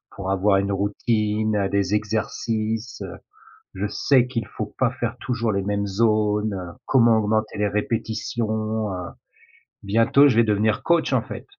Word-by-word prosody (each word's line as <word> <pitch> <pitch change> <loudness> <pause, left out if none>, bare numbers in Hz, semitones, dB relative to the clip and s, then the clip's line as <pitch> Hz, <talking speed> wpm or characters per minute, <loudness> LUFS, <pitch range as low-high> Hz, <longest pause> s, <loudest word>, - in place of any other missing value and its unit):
pour 95 -1 -3
avoir 95 +1 +3
une 100 +1 0
routine, 105 +1 0
des 100 0 0
exercices, 110 +2 -2 0.7
je - - -2
sais 130 -3 +2
qu'il 115 -3 -3
faut 105 0 -6
pas 130 - +2
faire 120 0 -2
toujours 120 -3 -1
les 100 - 0
mêmes 100 +1 -1
zones, 105 0 +1 0.3
comment 115 -3 +4
augmenter 110 0 -1
les 105 0 +1
répétitions, 110 0 -2
heu, 90 - -4 0.8
bientôt 115 +8 +4
je 130 - +2
vais 115 - +6
devenir 105 0 +1
coach, 170 -1 +2
en - - +3
fait. - - -8
110 Hz, 145 wpm, -23 LUFS, 105-115 Hz, 0.8 s, vais